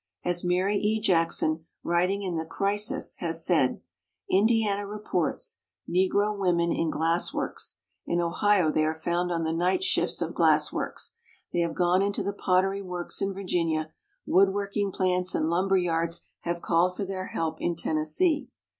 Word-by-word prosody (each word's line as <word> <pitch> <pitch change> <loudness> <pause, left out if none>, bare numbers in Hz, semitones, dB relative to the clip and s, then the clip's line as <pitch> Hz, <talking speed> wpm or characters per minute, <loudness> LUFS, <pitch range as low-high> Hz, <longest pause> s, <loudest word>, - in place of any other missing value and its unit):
As 175 0 +1
Mary 185 +3 +1
E. 215 +1 +1
Jackson, 165 -4 +1 0.2
writing 180 +4 +1
in 185 -2 -2
the 160 - -1
Crisis, 205 - -1
has 165 -2 0
said: 155 -8 +2 0.5
"Indiana 205 0 +2
reports 200 - -2 0.3
[Negro 200 +3 +1
women] 175 -3 +1
in 165 - 0
glass 165 +2 +1
works; - - -3 0.3
in 170 - 0
Ohio 175 0 +2
they 155 - +1
are 155 +1 0
found 175 +2 -1
on 165 -1 -1
the 160 0 -1
night 180 - +1
shifts 380 - +1
of - - -3
glass - - +3
works; - - -4 0.4
they - - +1
have 170 -1 0
gone 180 +1 +3
into 200 0 0
the 200 - -2
pottery 195 +1 +1
works 180 -1 -3
in 195 0 0
Virginia; 165 -5 -1 0.3
wood 195 +1 +4
work 200 0 -4
ing 200 -1 0
plants 185 -1 0
and 160 - 0
lumber 190 +3 +2
yards 170 -1 0
have 170 0 -4
called 175 +2 +2
for 200 - -2
their 185 -1 -4
help 165 -1 -3
in 175 - 0
Tennessee." 260 - +1
180 Hz, 165 wpm, -27 LUFS, 170-200 Hz, 0.5 s, wood